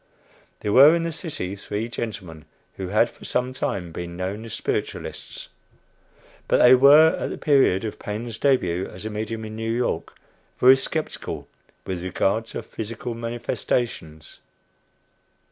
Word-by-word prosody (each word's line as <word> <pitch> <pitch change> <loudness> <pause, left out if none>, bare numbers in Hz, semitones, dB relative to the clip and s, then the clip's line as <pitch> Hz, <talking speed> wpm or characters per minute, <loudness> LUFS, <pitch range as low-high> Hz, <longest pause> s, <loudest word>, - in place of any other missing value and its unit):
There 105 - -1
were 145 +5 +8
in 170 - -1
the 165 - -2
city 150 - -5
three 105 +3 -4
gentlemen 95 -10 -6 0.3
who 95 - -4
had, 105 +5 +3
for - - -17
some 125 +1 -1
time, 90 -9 -3
been 85 +1 -6
known 95 +4 -4
as 115 - -7
spiritualists; - - -4 1.0
but - - +3
they 125 +1 +7
were, 145 +5 +7
at - - -2
the - - -5
period 135 -10 +3
of 110 - -5
Paine's 110 +2 -5
début 95 -10 +1
as 90 +3 -10
a 110 - -3
medium 110 +1 -4
in 110 0 -7
New 115 0 -3
York, 120 +1 -2 0.4
very 130 +1 +8
skeptical 155 +4 -4 0.4
with 95 -2 -4
regard 100 +4 0
to - - -6
"physical 115 +2 -6
manifestations." 115 -8 -3
110 Hz, 145 wpm, -24 LUFS, 95-125 Hz, 1.0 s, were